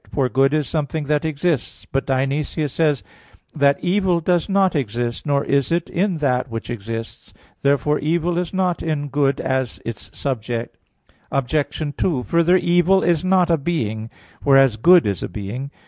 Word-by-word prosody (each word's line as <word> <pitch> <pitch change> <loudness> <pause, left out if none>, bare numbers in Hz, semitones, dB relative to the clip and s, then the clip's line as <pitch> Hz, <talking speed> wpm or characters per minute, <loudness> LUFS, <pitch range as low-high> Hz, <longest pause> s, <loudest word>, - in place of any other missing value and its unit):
For 135 -3 0
good 135 +1 +3
is 150 -2 0
something 155 0 -2
that 150 +2 0
exists. 160 -2 -2
But 135 - -1
Dionysius 140 +2 -1
says 150 -5 +1
(Div. - - -27
Nom. - - -26
iv, - - -28
4) - - -10 0.2
that - - -23
"evil 185 -1 +2
does 175 +1 0
not 195 -2 +2
exist, 120 -1 -2
nor 140 -1 +1
is 140 0 +1
it 170 0 -1
in 185 0 0
that 130 -4 0
which 115 +1 -5
exists." 115 0 -7 0.3
Therefore, 140 +1 +2
evil 170 +3 0
is 180 -2 -3
not 185 -2 0
in 150 -3 -2
good 140 0 +1
as 130 -2 -2
its 115 -3 -6
subject. 120 -3 -3 0.6
Obj. 145 +2 -1
2: 145 -9 0
Further, 170 - +3
evil 175 +2 +3
is 170 -1 +2
not 185 -2 +3
a 165 - +2
being; 110 -8 -2 0.3
whereas 135 -4 +5
good 170 +10 +6
is 100 -4 -1
a - - -4
being. 110 +7 -5
145 Hz, 180 wpm, -21 LUFS, 130-170 Hz, 0.6 s, good